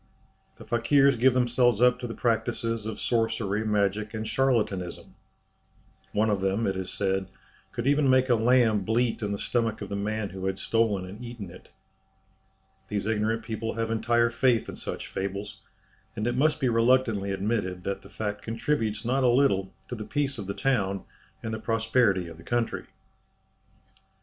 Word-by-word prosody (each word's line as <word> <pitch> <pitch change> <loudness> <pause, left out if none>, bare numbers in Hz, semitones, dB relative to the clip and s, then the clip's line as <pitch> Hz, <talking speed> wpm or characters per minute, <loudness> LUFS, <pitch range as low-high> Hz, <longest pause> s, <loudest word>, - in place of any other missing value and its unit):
The - - -13
Fakirs 135 +4 +4
give 125 +2 +4
themselves 120 -2 +3
up 125 0 +4
to 125 - -4
the 115 - -6
practices 115 -1 -1
of 110 -1 -5
sorcery, 110 -3 0
magic, 105 0 0
and 110 0 -3
charlatanism. 110 -9 0 1.0
One 110 +1 +2
of 100 -2 0
them, 95 +4 +1
it 95 - 0
is 95 -1 -4
said, 95 -1 -1 0.4
could 120 - -4
even 145 0 +3
make 130 0 +4
a 125 - +4
lamb 115 -2 +4
bleat 115 +3 0
in 105 -1 -2
the 100 - -1
stomach 115 0 -1
of 100 - -6
the 100 - -3
man 105 +1 -2
who 95 0 -5
had 95 0 -1
stolen 110 -5 +1
and 100 +6 -9
eaten 120 -7 -7
it! 90 - -14 1.2
These 100 -1 -2
ignorant 110 +1 0
people 115 0 -4
have 115 0 -1
entire 120 +1 +2
faith 120 -1 +2
in - - -6
such - - -5
fables, 100 +1 -5 0.5
and 110 -1 -2
it 120 0 0
must 150 +4 +2
be 135 - +1
reluctantly 115 -3 +2
admitted 95 -2 -2
that 100 +1 -3
the - - -14
fact 105 -1 -4
contributes 115 -2 -1
not 130 +3 +1
a 125 - +5
little 120 -7 +3 0.2
to - - -5
the 110 -3 -4
peace 140 0 -2
of 100 - -6
the 100 - -3
town 100 -8 0 0.4
and 110 - -3
the 110 - -3
prosperity 110 -4 +2
of 85 -1 -10
the 85 - -13
country. 120 +2 -1
110 Hz, 175 wpm, -27 LUFS, 100-120 Hz, 1.2 s, a